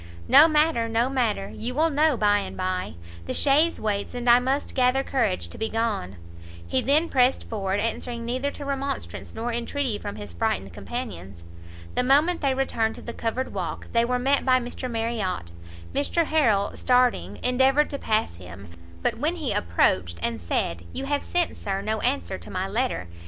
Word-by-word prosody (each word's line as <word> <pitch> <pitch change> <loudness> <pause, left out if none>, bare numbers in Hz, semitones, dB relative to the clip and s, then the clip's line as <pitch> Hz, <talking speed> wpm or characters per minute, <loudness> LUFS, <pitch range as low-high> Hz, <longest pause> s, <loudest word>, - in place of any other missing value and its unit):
"No 310 - +8
matter, 305 -7 +2
no 230 +3 +1
matter, 220 -7 0
you 245 +3 -4
will 320 +2 +3
know 300 -1 +3
by 205 -1 +3
and - - -6
by; 185 - -2 0.3
the - - -2
chaise 300 +4 +3
waits, 205 +1 -2
and 245 0 -4
I 240 +1 +8
must 265 +3 -1
gather 255 +1 +2
courage 220 -10 0
to - - -11
be 220 0 -1
gone." 220 - -2 0.5
He 85 +9 0
then 300 +5 +3
pressed 255 -2 +2
forward, 195 -3 -2
answering 235 +1 -3
neither 255 +4 -1
to 285 0 -8
remonstrance 275 0 -4
nor 230 +2 -2
intreaty 240 -1 -2
from 100 - -6
his 105 -4 -8
frightened 95 +2 -1
companions. 100 - -6 0.5
The - - +2
moment 295 +7 +3
they 275 -3 +1
returned 225 -4 0
to - - -11
the 235 - -6
covered 235 +4 -3
walk, - - -4
they 230 0 +3
were 250 +1 0
met 275 +3 +2
by 255 -1 +4
Mr 250 +1 -5
Marriot; 225 - -2 0.4
Mr 305 +4 +1
Harrel, 230 -11 +2
starting, 250 -1 +2
endeavoured 265 +4 +3
to 280 - -4
pass 215 - 0
him; 90 +1 -11 0.3
but - - 0
when 315 +4 0
he 290 -11 -2
approached, 85 - +1
and 115 -3 -2
said 85 0 -2
"you 275 - -3
have 285 0 0
sent, 350 -2 -1
Sir, 195 -1 -3
no 215 +1 -1
answer 90 0 -1
to 85 - -11
my - - -2
letter!" 90 +2 -1
240 Hz, 185 wpm, -25 LUFS, 195-275 Hz, 0.5 s, No